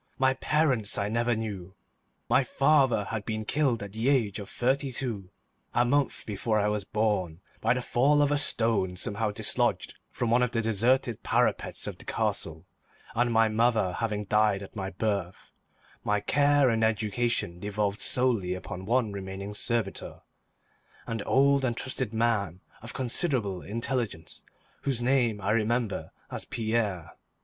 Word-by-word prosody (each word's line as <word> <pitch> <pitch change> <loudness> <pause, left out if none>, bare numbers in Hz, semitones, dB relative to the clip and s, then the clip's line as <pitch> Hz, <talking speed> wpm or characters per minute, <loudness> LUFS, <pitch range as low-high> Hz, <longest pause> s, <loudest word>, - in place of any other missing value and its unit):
My 130 0 +3
parents 130 -6 +1
I 100 0 -1
never 120 +2 +1
knew. 100 -4 -5 0.5
My 135 - +4
father 135 -5 +3
had 110 -2 -3
been 110 0 -3
killed 130 -5 +1
at 100 -1 -8
the 115 +4 0
age 115 -8 +1
of 100 - -8
thirty 135 +2 0
two, 115 -8 -3 0.5
a 120 - +4
month 140 +2 0
before 110 +1 -1
I 105 0 +2
was 105 -1 -1
born, 105 -7 -1 0.2
by 115 +3 +2
the 125 - -2
fall 145 +5 +3
of 145 - +1
a 145 - +3
stone 110 -9 +2
somehow 105 +4 -1
dislodged 105 - 0 0.2
from 120 -2 -2
one 120 +1 +4
of 125 - +2
the 115 -1 -1
deserted 115 +2 +1
parapets - - 0
of - - -6
the - - -9
castle, 80 +2 -2 0.5
and 120 +1 +1
my 115 0 +4
mother 110 -4 +2
having 105 0 -2
died 105 -1 +2
at 100 - -12
my 95 -2 -3
birth, 100 -2 -3 0.5
my 105 0 +1
care 145 +2 +3
and 115 -1 +1
education 110 -4 0
devolved 105 +1 -2
solely 115 -8 +1
upon 90 0 -7
one 120 -2 +2
remaining 100 +1 -6
servitor, 110 -1 -2 0.8
an 115 -2 -3
old 140 +1 +4
and 120 -3 0
trusted 130 -3 -2
man 110 -6 0 0.2
of 115 0 -9
considerable 120 - 0
intelligence, 115 -5 -3 0.4
whose 135 -4 -1
name 120 -4 +2
I 100 +1 -1
remember 115 0 0 0.2
as - - -5
Pierre. 110 -8 -2
110 Hz, 155 wpm, -28 LUFS, 100-125 Hz, 0.8 s, My